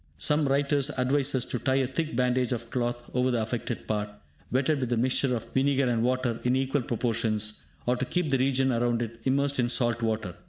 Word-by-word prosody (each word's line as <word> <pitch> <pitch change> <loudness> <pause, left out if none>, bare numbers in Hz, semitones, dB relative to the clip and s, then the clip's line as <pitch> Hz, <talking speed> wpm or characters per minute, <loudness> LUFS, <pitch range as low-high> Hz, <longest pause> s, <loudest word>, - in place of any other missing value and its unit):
Some 150 -1 +2
writers 140 +1 +1
advise 135 +2 +1
us 125 -1 +1
to 125 - -3
tie 130 +2 +1
a 135 -1 +2
thick 155 +4 -3
bandage 125 0 +1
of 120 -1 -4
cloth 120 -1 -2
over 125 +1 +2
the 120 -2 +1
affected 115 +1 -4
part, 105 -1 -1 0.4
wetted 140 +3 +2
with 125 -2 -2
a - - +1
mixture 130 +1 +2
of 115 0 -7
vinegar 135 0 +2
and 120 -2 +1
water 125 -1 0
in 125 +1 +2
equal 135 +1 +1
proportions, 110 -3 -1 0.2
or 125 - +2
to 130 - -1
keep 175 +1 -1
the 135 - +3
region 135 0 +2
around 120 0 +1
it 115 0 -7
immersed 140 +1 +1
in 120 -1 +2
salt 120 -1 0
water. 110 -5 -1
125 Hz, 210 wpm, -27 LUFS, 120-135 Hz, 0.4 s, the